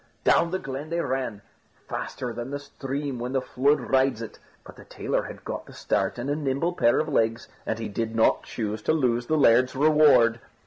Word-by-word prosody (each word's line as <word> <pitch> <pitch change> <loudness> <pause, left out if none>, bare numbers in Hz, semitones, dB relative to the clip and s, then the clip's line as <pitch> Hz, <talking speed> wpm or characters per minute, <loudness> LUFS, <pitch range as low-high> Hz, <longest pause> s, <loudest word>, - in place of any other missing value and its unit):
Down 170 - +4
the 185 - -1
glen 135 -1 -6
they 170 +1 -1
ran, 130 -8 -3 0.4
faster 125 -2 -4
than 120 +2 -5
the 140 - -3
stream 140 -1 -5
when 125 +2 -4
the 135 - +2
flood 140 +4 +2
rides 130 -3 +1
it; 115 -2 -8 0.3
but - - -12
the - - -13
tailor - - -2
had - - -10
got - - -5
the - - -13
start - - -1
and 120 +2 -4
a 145 - 0
nimble 150 +4 -1
pair 120 -8 +3
of 155 - -1
legs, 115 -5 0 0.2
and 110 - -1
he 115 -1 -4
did 110 +2 -3
not 110 - +3
choose 110 -2 -4
to - - +1
lose 120 -5 +1
the 155 - +1
laird's 130 -1 +4
reward. 140 -6 +5
130 Hz, 210 wpm, -25 LUFS, 115-145 Hz, 0.4 s, reward